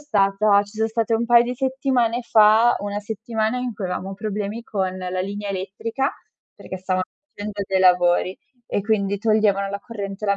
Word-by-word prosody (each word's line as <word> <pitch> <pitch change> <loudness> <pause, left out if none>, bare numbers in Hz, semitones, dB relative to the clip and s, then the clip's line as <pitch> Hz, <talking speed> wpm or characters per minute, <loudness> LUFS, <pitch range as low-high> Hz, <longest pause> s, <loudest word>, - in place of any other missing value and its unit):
stata 200 -6 +3
ci 205 +1 -15
son 220 0 +1
state 225 0 0
un 230 +1 +1
paio 235 0 +6
di 245 +1 -3
settimane 260 -2 0
fa, 220 +1 +5
una 205 0 -3
settimana 220 +2 -2
in 250 -1 -3
cui 205 -2 -6
avevamo 185 +1 -3
problemi 210 +2 -4
con 190 -4 -2
la 185 0 -3
linea 205 +2 -4
elettrica, 200 +7 -3 0.4
perché 185 - -8
stavano 185 0 -1 0.3
facendo 205 0 -5
dei 190 0 0
lavori 180 0 +3 0.3
e 205 - -1
quindi 200 -2 0
toglievano 210 -2 +2
la 200 - -3
corrente, 200 -2 -6
la 200 0 +2
205 Hz, 175 wpm, -22 LUFS, 195-225 Hz, 0.4 s, paio